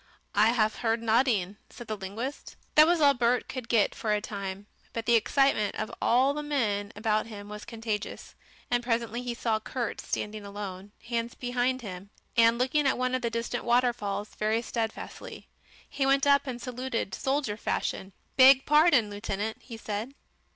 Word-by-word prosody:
"I 210 Hz, +2 st, +5 dB
haf 220 Hz, -2 st, +1 dB
heard 230 Hz, -1 st, 0 dB
noding," 220 Hz, -4 st, +2 dB
said 240 Hz, -, -10 dB
the 215 Hz, -, -3 dB
linguist. 215 Hz, +8 st, -6 dB, 0.2 s
That 305 Hz, +1 st, +7 dB
was 345 Hz, 0 st, +3 dB
all 285 Hz, -1 st, +6 dB
Bert 245 Hz, -1 st, +1 dB
could 255 Hz, -3 st, -6 dB
get 225 Hz, -4 st, +3 dB
for 215 Hz, -, -2 dB
a 210 Hz, -, +2 dB
time. 200 Hz, -1 st, -6 dB, 0.3 s
But 230 Hz, -1 st, -4 dB
the 235 Hz, -, +3 dB
excitement 230 Hz, -1 st, +3 dB
of 235 Hz, -, -4 dB
all 260 Hz, +4 st, +3 dB
the 300 Hz, -, -3 dB
men 215 Hz, -9 st, -1 dB
about 215 Hz, +1 st, 0 dB
him 205 Hz, -2 st, -9 dB
was 210 Hz, 0 st, -8 dB
contagious, 225 Hz, -3 st, -5 dB, 0.4 s
and 245 Hz, 0 st, +2 dB
presently 235 Hz, 0 st, -1 dB
he 245 Hz, -1 st, -4 dB
saw 225 Hz, -2 st, 0 dB
Kurt 240 Hz, +1 st, -4 dB
standing 210 Hz, 0 st, -4 dB
alone, 200 Hz, -1 st, -7 dB
hands 235 Hz, 0 st, -2 dB
behind 250 Hz, +1 st, -1 dB
him, 195 Hz, -1 st, -8 dB, 0.3 s
and 230 Hz, 0 st, +5 dB
looking 270 Hz, +4 st, +2 dB
at -, -, +2 dB
one 255 Hz, 0 st, 0 dB
of 255 Hz, -, 0 dB
the 235 Hz, -, 0 dB
distant 230 Hz, +1 st, -3 dB
waterfalls 235 Hz, -4 st, +1 dB
very 220 Hz, +2 st, 0 dB
steadfastly. 225 Hz, -1 st, -5 dB, 0.4 s
He 270 Hz, -1 st, -1 dB
went 275 Hz, +1 st, +3 dB
up 280 Hz, 0 st, +4 dB
and 245 Hz, -2 st, -4 dB
saluted, 250 Hz, -5 st, -3 dB
soldier 270 Hz, -5 st, -1 dB
fashion. 195 Hz, -2 st, -3 dB, 0.3 s
"Beg 265 Hz, 0 st, +8 dB
pardon, 300 Hz, -8 st, +4 dB
lieutenant," 205 Hz, +1 st, -3 dB
he 230 Hz, -2 st, -9 dB
said. 220 Hz, +5 st, -5 dB
230 Hz, 170 wpm, -28 LUFS, 210-255 Hz, 0.4 s, Beg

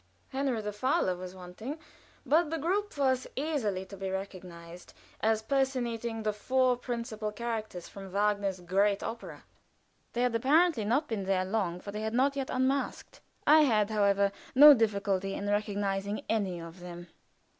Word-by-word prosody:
Henry 265 Hz, -3 st, -1 dB
the 210 Hz, 0 st, -4 dB
Fowler 210 Hz, -5 st, +1 dB
was 180 Hz, +1 st, -8 dB
wanting, 185 Hz, -, -7 dB, 0.5 s
but 320 Hz, +1 st, +3 dB
the 325 Hz, -, -2 dB
group 380 Hz, +5 st, -1 dB
was 260 Hz, -2 st, +1 dB
easily 250 Hz, -10 st, -1 dB
to 200 Hz, -, -10 dB
be 195 Hz, 0 st, -4 dB
recognized 180 Hz, -3 st, -8 dB, 0.2 s
as 220 Hz, 0 st, +1 dB
personating 235 Hz, -4 st, -1 dB
the 215 Hz, -1 st, 0 dB
four 255 Hz, +4 st, +2 dB
principal 230 Hz, -3 st, -4 dB
characters 220 Hz, -5 st, -4 dB
from 195 Hz, -1 st, -10 dB
Wagner's 200 Hz, -2 st, 0 dB
great 195 Hz, +3 st, +1 dB
opera. 230 Hz, +1 st, -7 dB, 0.7 s
They 240 Hz, -, 0 dB
had 250 Hz, -1 st, +1 dB
apparently 275 Hz, +1 st, +3 dB
not 255 Hz, +8 st, +1 dB
been 210 Hz, -4 st, -3 dB
there 185 Hz, -1 st, +1 dB
long, 190 Hz, -3 st, -1 dB
for 200 Hz, -, -7 dB
they 210 Hz, +1 st, -5 dB
had 220 Hz, +1 st, -2 dB
not 275 Hz, +3 st, +3 dB
yet 270 Hz, -2 st, -3 dB
unmasked. 265 Hz, +2 st, -1 dB, 0.2 s
I 310 Hz, +1 st, +7 dB
had, 220 Hz, -7 st, +3 dB
however, 200 Hz, -1 st, +3 dB, 0.2 s
no 295 Hz, +3 st, +11 dB
difficulty 200 Hz, -4 st, 0 dB
in 200 Hz, -, -4 dB
recognizing 205 Hz, 0 st, -1 dB
any 195 Hz, -6 st, -1 dB
of 165 Hz, +2 st, -10 dB
them. 175 Hz, 0 st, -9 dB
215 Hz, 155 wpm, -30 LUFS, 195-255 Hz, 0.7 s, no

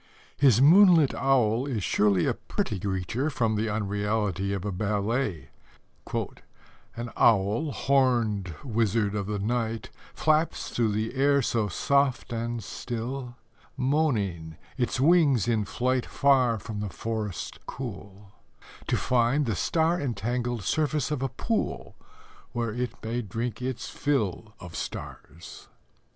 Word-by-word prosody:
His 130 Hz, -6 st, +5 dB
moonlight 170 Hz, -2 st, +7 dB
owl 125 Hz, -2 st, +2 dB
is 115 Hz, -8 st, -2 dB
surely 100 Hz, -3 st, +2 dB
a -, -, +2 dB
pretty 100 Hz, -, -3 dB
creature 100 Hz, -, -2 dB
from 115 Hz, -6 st, 0 dB
the 110 Hz, +1 st, 0 dB
unreality 105 Hz, -1 st, -1 dB
of 100 Hz, -1 st, -3 dB
a 105 Hz, -, -1 dB
ballet: 105 Hz, -, -1 dB, 1.5 s
An 120 Hz, 0 st, -5 dB
owl, 110 Hz, +7 st, +3 dB
horned 120 Hz, -, +1 dB
wizard 110 Hz, -4 st, +1 dB
of 100 Hz, -2 st, -2 dB
the 105 Hz, 0 st, -2 dB
night, 115 Hz, +2 st, -2 dB, 0.2 s
Flaps 155 Hz, +1 st, +1 dB
through 115 Hz, -3 st, +1 dB
the 110 Hz, +2 st, -2 dB
air 140 Hz, +1 st, +3 dB
so 115 Hz, -2 st, 0 dB
soft 135 Hz, +4 st, +1 dB
and 115 Hz, 0 st, -3 dB
still; 120 Hz, +4 st, -5 dB, 0.4 s
Moaning, 110 Hz, -, 0 dB, 0.2 s
it 125 Hz, 0 st, -1 dB
wings 145 Hz, -, +4 dB
its 110 Hz, -4 st, 0 dB
flight 130 Hz, 0 st, 0 dB
Far 130 Hz, -4 st, +3 dB
from 105 Hz, 0 st, -6 dB
the 105 Hz, -1 st, -3 dB
forest 110 Hz, -2 st, -4 dB
cool, 100 Hz, -5 st, -8 dB, 0.6 s
To -, -, +1 dB
find 125 Hz, +4 st, +2 dB
the 115 Hz, -4 st, -1 dB
star 165 Hz, -, +1 dB
entangled 120 Hz, -2 st, -2 dB
surface 150 Hz, -, 0 dB
of 150 Hz, -4 st, -1 dB
a 135 Hz, -, 0 dB
pool, 225 Hz, -, -3 dB, 0.6 s
Where 120 Hz, -3 st, -2 dB
it 125 Hz, +1 st, -2 dB
may 115 Hz, +2 st, -2 dB
drink 115 Hz, +3 st, -4 dB
its 130 Hz, -1 st, -3 dB
fill 110 Hz, -6 st, -2 dB
Of 90 Hz, -2 st, -10 dB
stars. 80 Hz, +5 st, -8 dB
115 Hz, 130 wpm, -27 LUFS, 105-135 Hz, 1.5 s, moonlight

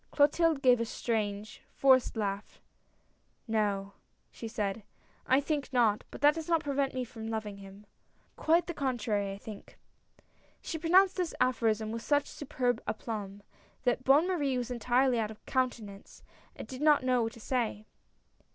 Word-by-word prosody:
" -, -, -40 dB
Clotilde 300 Hz, 0 st, +3 dB
gave 250 Hz, -2 st, +5 dB
a 230 Hz, -, 0 dB
strange, 215 Hz, -3 st, -3 dB
forced 260 Hz, -4 st, +3 dB
laugh. 200 Hz, -1 st, -3 dB, 0.5 s
" -, -, -41 dB, 0.3 s
No," 200 Hz, -3 st, -1 dB, 0.4 s
she 230 Hz, -, -7 dB
said, 215 Hz, -2 st, -3 dB, 0.2 s
" -, -, -33 dB
I 260 Hz, -, +5 dB
think 285 Hz, -2 st, -2 dB
not. 230 Hz, -5 st, +2 dB
But -, -, -10 dB
that 295 Hz, +1 st, +6 dB
does 320 Hz, +1 st, -6 dB
not 330 Hz, -2 st, +2 dB
pre 285 Hz, -, -2 dB
vent 275 Hz, -1 st, 0 dB
me 255 Hz, -, -1 dB
from 225 Hz, -2 st, -8 dB
loving 215 Hz, -2 st, -4 dB
him. 195 Hz, +1 st, -13 dB, 0.5 s
Quite 330 Hz, +2 st, +2 dB
the 345 Hz, -, -4 dB
contrary, 235 Hz, -8 st, -1 dB
I 195 Hz, -, -6 dB
think! 205 Hz, 0 st, -11 dB, 0.4 s
" -, -, -34 dB
She 320 Hz, -, -4 dB
pronounced 370 Hz, +4 st, +4 dB
this 360 Hz, -3 st, -2 dB
aphorism 220 Hz, -3 st, +1 dB
with 230 Hz, 0 st, -4 dB
such 290 Hz, +3 st, +1 dB
superb 250 Hz, -4 st, -2 dB
aplomb, 210 Hz, -2 st, -5 dB, 0.4 s
that 250 Hz, 0 st, +1 dB
Bonne 285 Hz, +7 st, +5 dB
Marie 290 Hz, -8 st, 0 dB
was 245 Hz, 0 st, -3 dB
entirely 245 Hz, +1 st, +2 dB
out 215 Hz, -1 st, -1 dB
of 215 Hz, -, -13 dB
counte 255 Hz, -3 st, 0 dB
nance, 200 Hz, -1 st, -12 dB, 0.3 s
and -, -, -8 dB
did 260 Hz, +1 st, -8 dB
not 300 Hz, -3 st, +4 dB
know 255 Hz, -1 st, +2 dB
what 225 Hz, 0 st, -2 dB
to -, -, -13 dB
say. 225 Hz, -3 st, -2 dB
245 Hz, 180 wpm, -30 LUFS, 215-280 Hz, 0.5 s, that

